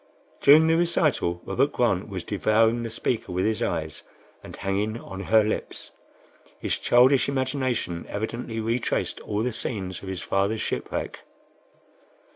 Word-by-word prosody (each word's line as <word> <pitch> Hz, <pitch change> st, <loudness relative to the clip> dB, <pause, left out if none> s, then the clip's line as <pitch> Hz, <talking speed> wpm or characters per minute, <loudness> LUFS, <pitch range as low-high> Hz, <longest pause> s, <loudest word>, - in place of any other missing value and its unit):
During 150 Hz, +3 st, +7 dB
the 165 Hz, 0 st, +3 dB
recital, 155 Hz, -, +1 dB
Robert -, -, +1 dB
Grant -, -, 0 dB
was -, -, -5 dB
devouring 115 Hz, +2 st, +2 dB
the 115 Hz, -, -4 dB
speaker 115 Hz, -2 st, -2 dB
with 90 Hz, +1 st, 0 dB
his 110 Hz, 0 st, 0 dB
eyes, 80 Hz, -2 st, -2 dB, 0.4 s
and -, -, -10 dB
hanging 105 Hz, +4 st, -2 dB
on 95 Hz, -, -9 dB
her 110 Hz, +2 st, +4 dB
lips. 110 Hz, -, -4 dB, 0.7 s
His -, -, -2 dB
childish 125 Hz, +2 st, +4 dB
imagination 130 Hz, -10 st, -2 dB
evidently 115 Hz, +2 st, -4 dB
retraced 115 Hz, +2 st, -1 dB
all 105 Hz, +1 st, -2 dB
the 125 Hz, -1 st, -1 dB
scenes 95 Hz, -5 st, -4 dB
of 95 Hz, -, -9 dB
his 95 Hz, -2 st, -4 dB
father's 100 Hz, +3 st, 0 dB
shipwreck. -, -, -3 dB
110 Hz, 140 wpm, -25 LUFS, 100-125 Hz, 0.7 s, During